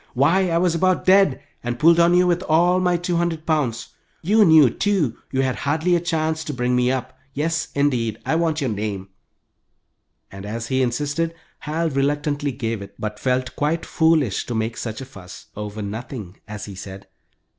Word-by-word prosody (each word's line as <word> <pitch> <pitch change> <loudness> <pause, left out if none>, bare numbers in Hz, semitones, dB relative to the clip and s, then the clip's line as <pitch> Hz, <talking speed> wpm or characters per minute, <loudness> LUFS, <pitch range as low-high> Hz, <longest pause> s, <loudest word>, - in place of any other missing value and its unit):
Why, 170 +8 +3
I 165 - +1
was 175 -1 +2
about 185 +2 +1
dead, 190 -7 +4 0.2
and 120 0 -3
pulled 165 +5 +5
on 170 +1 +5
you 180 0 +5
with 175 0 +1
all 175 +3 +4
my 180 -1 +2
two 175 0 -1
hundred 165 -2 -1
pounds. 140 -8 -1 0.3
You 210 +6 +4
knew, 160 -6 +7
too, 160 - 0
you 135 0 0
had 130 -1 -1
hardly 160 +5 +1
a - - +2
chance 160 -2 -1
to 150 - -4
bring 125 0 0
me 125 0 +2
up. 130 0 -3 0.2
Yes, 160 +2 -1
indeed, 125 -6 +1
I - - 0
want 160 -1 0
your 130 -4 0
name," 100 -2 -4 1.2
and 95 0 -9
as 115 +3 -5
he 130 0 +1
insisted, 145 +6 -1 0.2
Hal 160 +2 -2
reluctantly 145 +1 0
gave 115 -4 -3
it, 100 - -10
but 105 -1 -5
felt 130 0 -1
quite 155 +3 -1
foolish 160 - +1
to 120 - -3
make 110 +1 -1
such 110 +1 -5
a - - -6
fuss 95 -8 -12
"over 105 0 -5
nothing," 105 -2 -7
as 105 -1 -7
he 100 - -9
said. 95 0 -9
145 Hz, 190 wpm, -22 LUFS, 115-165 Hz, 1.2 s, knew